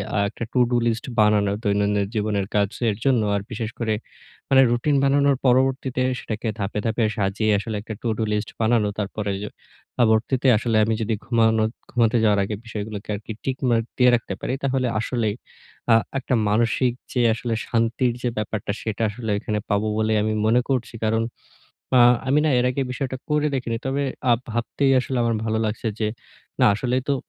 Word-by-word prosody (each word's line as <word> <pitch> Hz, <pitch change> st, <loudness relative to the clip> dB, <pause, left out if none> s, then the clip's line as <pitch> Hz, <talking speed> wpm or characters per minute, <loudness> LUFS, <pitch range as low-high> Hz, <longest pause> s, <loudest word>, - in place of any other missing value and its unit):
আ -, -, +1 dB
একটা 115 Hz, -, -7 dB
to 125 Hz, -, +2 dB
do 120 Hz, -, +2 dB
list 115 Hz, 0 st, -1 dB
বানানো 105 Hz, -1 st, +4 dB
দৈনন্দিন 100 Hz, -1 st, +1 dB
জীবনের 105 Hz, -2 st, 0 dB
কাজের 105 Hz, +2 st, 0 dB
জন্য 130 Hz, -4 st, +3 dB
আর 100 Hz, -, -1 dB
বিশেষ 110 Hz, -1 st, -3 dB
করে 110 Hz, -2 st, 0 dB, 0.6 s
মানে 135 Hz, -1 st, +6 dB
রুটিন 120 Hz, +5 st, +1 dB
বানানোর 140 Hz, 0 st, +3 dB
পরবর্তীতে 130 Hz, 0 st, +2 dB, 0.2 s
সেটাকে 110 Hz, +1 st, -5 dB
ধাপে, 100 Hz, +1 st, -2 dB
ধাপে 115 Hz, +1 st, 0 dB
সাজিয়ে 105 Hz, +2 st, +1 dB
আসলে 110 Hz, +1 st, -4 dB
একটা 110 Hz, +1 st, -7 dB
টু -, -, -3 dB
ডু 110 Hz, -, 0 dB
লিস্ট 105 Hz, 0 st, -2 dB
বানানো। 110 Hz, -2 st, +3 dB
তারপরে 105 Hz, 0 st, -3 dB
এই -, -, -5 dB
যে 105 Hz, -, -4 dB, 0.5 s
পরবর্তীতে 120 Hz, +3 st, +2 dB
আসলে 115 Hz, 0 st, 0 dB
আমি 110 Hz, -, 0 dB
যদি 110 Hz, +1 st, 0 dB
ঘুমানো 110 Hz, -2 st, +3 dB, 0.3 s
ঘুমাতে 120 Hz, -1 st, +2 dB
যাওয়ার 105 Hz, -2 st, +3 dB
আগে 105 Hz, +2 st, -3 dB
বিষয়গুলোকে 105 Hz, -2 st, -6 dB
আরকি 105 Hz, +2 st, -8 dB
টিক 130 Hz, -1 st, -1 dB
মার্ক 115 Hz, -1 st, +2 dB
দিয়ে 125 Hz, -1 st, +6 dB
রাখতে 115 Hz, -4 st, -3 dB
পারি -, -, -2 dB
তাহলে 130 Hz, -2 st, +1 dB
আসলেই 115 Hz, -2 st, -1 dB, 0.6 s
আ -, -, +8 dB, 0.2 s
একটা 130 Hz, -1 st, -1 dB
মানসিক 120 Hz, +3 st, +2 dB, 0.2 s
যে 125 Hz, -, +1 dB
আসলে 115 Hz, +1 st, -3 dB
শান্তির 115 Hz, +1 st, +1 dB
যে 120 Hz, -, +1 dB
ব্যাপারটা 105 Hz, -1 st, -2 dB
সেটা 110 Hz, 0 st, -3 dB
আসলে 110 Hz, 0 st, -4 dB
এখানে 105 Hz, 0 st, -2 dB
পাবো 105 Hz, +1 st, +1 dB
বলে 110 Hz, 0 st, +1 dB
আমি 110 Hz, -, 0 dB
মনে 120 Hz, +3 st, +4 dB
করছি। 125 Hz, -3 st, -1 dB
কারণ 110 Hz, +1 st, +2 dB, 0.8 s
আ -, -, +7 dB, 0.3 s
আমি 140 Hz, -, +4 dB
না 155 Hz, -, +3 dB
এর 125 Hz, -, +2 dB
আগে 135 Hz, +2 st, -1 dB
বিষয়টা 130 Hz, 0 st, -3 dB
করে 150 Hz, 0 st, +1 dB
দেখিনি। 120 Hz, -3 st, -2 dB
তবে 140 Hz, +2 st, 0 dB, 0.3 s
আ -, -, +7 dB, 0.2 s
ভাবতেই 120 Hz, +4 st, 0 dB
আসলে 130 Hz, 0 st, -4 dB
আমার 115 Hz, -1 st, +1 dB
ভালো 110 Hz, 0 st, 0 dB
লাগছে 110 Hz, +2 st, -4 dB
যে 110 Hz, -, +1 dB, 0.6 s
না -, -, +7 dB
আসলেই 125 Hz, +3 st, -1 dB
তো -, -, +3 dB
115 Hz, 185 wpm, -23 LUFS, 105-125 Hz, 0.8 s, আ